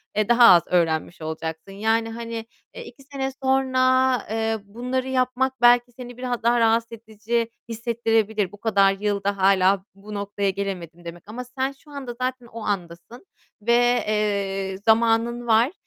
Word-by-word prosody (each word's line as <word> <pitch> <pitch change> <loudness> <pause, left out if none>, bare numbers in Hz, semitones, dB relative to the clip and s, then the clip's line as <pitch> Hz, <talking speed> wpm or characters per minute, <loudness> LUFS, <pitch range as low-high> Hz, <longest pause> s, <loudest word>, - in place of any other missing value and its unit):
eee, 215 +1 0
daha 240 0 +5
az 170 - +5
öğrenmiş 165 -1 0
olacaksın. 160 +3 -6
Yani, 225 +3 0
hani, 230 0 -6 0.3
eee, - - -7
2 270 +3 -14
sene 270 -1 -4
sonra, 260 -1 +3
eee, 225 0 -1
bunları 250 +5 -4
yapmak 260 0 0
belki 245 0 +5
seni 245 0 -10
biraz 245 -2 -3
daha 235 +1 +3
rahatsız 230 0 +2
edici 225 +1 -3 0.2
hissettirebilir. 225 -3 0
"Bu 205 - -14
kadar 200 -3 +3
yılda 200 -1 -1
hâlâ 190 0 +3
bu 210 +2 -11
noktaya 200 0 -2
gelemedim" 180 -3 -5
demek 170 +1 -9
ama 240 +4 -6
sen 260 +2 -3
şu 285 +2 -19
anda 265 -4 -6
zaten 255 -1 -2
o 230 0 -9
andasın 185 - -5 0.4
ve, 235 +3 +3 0.3
eee, 200 -2 -1
zamanın 230 +1 +2
var. 230 +4 +4
225 Hz, 150 wpm, -23 LUFS, 200-245 Hz, 0.4 s, daha